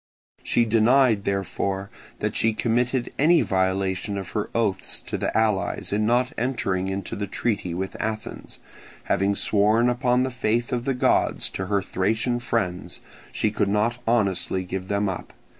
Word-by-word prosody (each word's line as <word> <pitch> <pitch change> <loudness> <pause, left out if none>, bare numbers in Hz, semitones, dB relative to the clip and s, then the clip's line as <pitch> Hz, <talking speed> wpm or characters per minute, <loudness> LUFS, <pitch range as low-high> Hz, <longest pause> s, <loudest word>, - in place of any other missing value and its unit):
She 120 - +2
denied, 115 -1 +4
therefore, 100 0 -2 0.3
that - - -1
she 115 -1 +2
committed 120 +2 0
any 165 +4 +5
violation 95 +1 0
of 95 -3 -5
her 105 - -3
oaths 105 -5 0
to - - -5
the - - -1
allies 110 -3 0
in 105 +1 +1
not 120 +2 +2
entering 100 -7 -1
into 95 0 -4
the 100 0 -3
treaty 100 -4 -2
with 95 +1 -4
Athens; 110 0 -5 0.4
having 100 +2 +1
sworn 110 +4 +3
upon 125 +1 +2
the 130 - -2
faith 120 0 -1
of 120 0 -1
the 135 - 0
gods 125 - +2
to 95 - -4
her 100 -1 +1
Thracian 110 +6 0
friends, 100 -7 -2 0.3
she 110 - 0
could 105 -2 0
not 110 +4 +1
honestly 100 -5 +1
give 95 +1 -5
them 100 +1 0
up. 95 -2 -5
105 Hz, 160 wpm, -24 LUFS, 95-120 Hz, 0.4 s, any